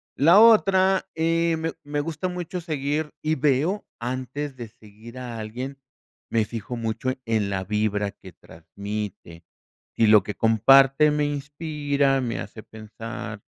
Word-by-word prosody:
La 170 +8 +6
otra, 195 -4 +5
eh, 165 0 +1
me 160 0 -3
me 145 0 -2
gusta 160 +3 -3
mucho 180 0 -5
seguir 150 -2 -3
y 155 +1 0
veo, 150 +8 +1
antes 130 +3 -4
de 120 -2 -7
seguir 110 +1 -15
a 120 -2 -6
alguien, 125 +6 -6 0.5
me 115 -1 +2
fijo 115 +2 -6
mucho 115 +2 -3 0.2
en 110 -3 0
la 95 -1 -2
vibra 105 0 -1
que 95 -2 -14
transmite. 85 +1 -8 0.5
Sí, 115 - +3
lo 105 -1 +6
que 105 - -6
comparte 135 +6 +5
me 150 0 +1
inspira, 145 -1 -1
me 120 -2 -3
hace 110 - -8
pensar, 110 +1 -8
130 Hz, 140 wpm, -24 LUFS, 110-150 Hz, 0.5 s, La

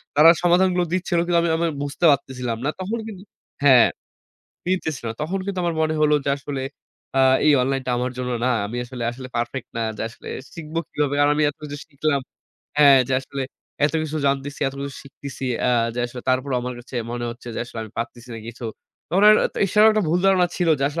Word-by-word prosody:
তারা 150 +3 +8
সমাধানগুলো 180 +1 +3
দিচ্ছিল, 180 -1 0
কিন্তু 175 0 +2
আমি 170 - +1
আমি 170 +1 +1 0.2
বুঝতে 145 +4 -1
পারতেছিলাম 125 -4 -2
না। - - +2
তখন 200 +5 -2
কিন্তু 195 -4 -9 0.4
হ্যাঁ, 130 -4 +7 0.8
মিলতেছে 175 -6 -1
না। 110 - -2
তখন 180 +6 -2
কিন্তু 200 -2 -3
আমার 170 -1 0
মনে 155 0 +1
হলো 150 0 +4
যে, 140 - +1
আসলে 140 -1 -5 0.6
আ - - +5 0.3
এই 150 - +7
অনলাইনটা 135 0 -1
আমার 125 +1 -1
জন্য 125 0 -2
না। - - +3 0.2
আমি 115 +4 -6
আসলে 125 0 -7
আসলে 130 +1 -9
পারফেক্ট 120 +2 -3
না। - - -1 0.2
যে - - -4
আসলে 115 - -12 0.3
শিখব 160 -1 -9 0.2
কিভাবে 145 -1 0
কারণ 145 0 +4
আমি 155 - +2
এত - - -21
কিছু 145 -1 -6
শিখলাম। 150 -1 0 0.6
হ্যাঁ, 140 -2 +8
যে - - -1
আসলে 135 0 -5 0.4
এতকিছু 155 +1 0
জানতেছি, 140 +1 -1
এতকিছু 140 0 -6
শিখতেছি, 140 -1 -8 0.2
আ - - +4 0.2
যে, - - -5
আসলে 125 +1 -8
তারপরেও, 130 +1 +1
আমার 125 0 -4
কাছে 120 +2 -13 0.2
মনে 120 0 -3
হচ্ছে 120 +1 -10
যে, - - -4
আসলে 120 - -9
আমি 110 - -9
পারতেছি 120 +1 -5
না 115 - -6
কিছু। 120 +1 -8 0.4
তখন 185 +5 +2
আর, 215 - +8 0.3
এছাড়াও 210 +3 +5
একটা 215 0 +1
ভুল 170 +3 +2
ধারণা 185 -2 +4
ছিল 175 - +1
যে, - - -2
আসলে 160 +3 -4
140 Hz, 205 wpm, -22 LUFS, 125-170 Hz, 0.8 s, তারা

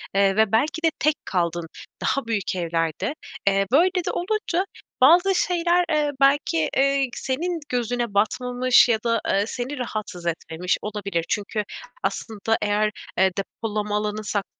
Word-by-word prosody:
eee, 195 0 +3
ve 220 -2 +3
belki 305 +8 +1
de 325 - +4
tek 305 0 +3
kaldın 170 -2 -1 0.3
daha 275 -2 0
büyük 205 -4 -1
evlerde. 165 - -1 0.3
Eee, 195 0 +3
böyle 345 +7 +5 0.2
de - - +1
olunca 375 -1 -1 0.4
bazı 355 +7 +6
şeyler, 350 0 +2
eee, 300 -1 +2
belki, 275 - +3
eee, 275 0 +3
ik 250 - -4
senin 330 +6 -2
gözüne 240 -2 -1
batmamış 250 +4 +3
ya 220 -2 +3
da, 230 -1 +2
eee, 200 +1 +3
seni 255 +4 -4
rahatsız 215 -7 -5
etmemiş 170 +1 -1
olabilir. 200 -5 -3
Çünkü 210 +1 -1 0.4
aslında 215 +3 -1
eğer, 210 +1 +1 0.3
eee, 190 0 +4
depolama 210 +1 -2
alanı, 210 0 -2
sak 205 -1 -1
220 Hz, 150 wpm, -23 LUFS, 200-275 Hz, 0.4 s, bazı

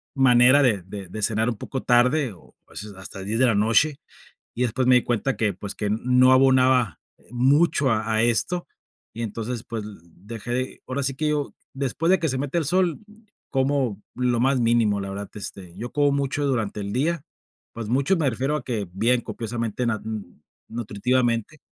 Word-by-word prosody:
manera 130 +1 +6
de 110 -7 +2
de 95 +1 -8
de 110 +5 -7
cenar 110 +2 +1
un 115 - -3
poco 130 +5 -5
tarde, 125 +1 +3
o 85 - -20
a - - -24
veces 105 0 -8
hasta 95 +1 -9
las 95 - -7
10 110 +2 -1
de 130 - +5
la 115 -4 +3
noche. 115 +8 +3 0.6
Y 125 - -2
después 125 +1 0
me 125 - +7
di 125 - +4
cuenta 120 +3 -1
que, 105 -3 +1
pues, 100 +2 -7
que 105 - -2
no 125 +4 +4
abonaba, 130 - +4 0.2
eh, - - -25
mucho 135 +3 +3
a 110 0 0
a 110 0 +2
esto. 120 +10 +1 0.5
Y 115 - -5
entonces, 115 +2 -4
pues, 115 -3 -5
l 105 -1 -10
dejé 115 +8 -5
ahora 135 +2 -3
sí 135 0 -1
que 155 +3 -1
yo 150 -2 -1 0.2
después 140 +5 -1
de 190 - +5
que 160 -1 -1
se 130 -2 -1
mete 145 +5 -1
el 165 - 0
sol, 175 +2 +1 0.5
como 130 -6 0
lo 125 -2 0
más 135 +2 +3
mínimo, 115 -3 +2
la 100 0 -5
verdad, 100 +1 -6
este, 95 -4 -7
yo 120 +1 -6
como 145 -1 +2
mucho 140 +1 -1
durante 115 -7 -1
el 100 0 -4
día, 155 +6 0 0.5
pues, 115 -2 -6
mucho, 135 - +2
me 155 -5 +1
refiero 135 +5 -1
a 150 - -6
que 110 -7 -3
bien 115 +6 +2
copiosamente 115 +1 -3
na 110 -3 -1
mm, 110 -7 -7 0.3
nutritivamente, 120 +4 -1
120 Hz, 200 wpm, -24 LUFS, 110-135 Hz, 0.6 s, me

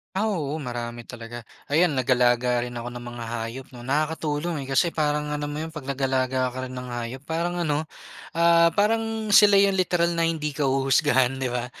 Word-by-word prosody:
Ah 215 +3 +1
oo, 155 -6 -2
marami 120 -2 -5
talaga. 120 0 -8 0.2
Ayan 155 0 +2
nag-alaga 125 -1 +2
rin 120 0 -5
ako 120 - -6
ng 120 0 -6
mga 120 -1 -7
hayop 115 +3 -5
no 120 - -10
nakakatulong 150 +3 -1
eh 135 - -8
kasi 165 +5 +2
parang 150 -1 0
alam 145 0 -3
mo 145 - -5
yun 160 +1 -5
pag 145 -4 -7
nag-alaga 130 -1 0
ka 130 0 -5
rin - - -9
ng 125 - -6
hayop 120 +2 -6
parang 170 +3 -2
ano, 150 -1 +1 0.6
ah, 170 0 +5
parang 220 0 +1
sila 205 0 +8
yun 195 0 +4
literal 175 -2 +1
na 170 - -1
hindi 160 -3 -1
ka 140 -1 0
huhusgahan 135 -1 +2
di 130 - 0
ba? 120 0 -2
140 Hz, 195 wpm, -25 LUFS, 125-165 Hz, 0.6 s, sila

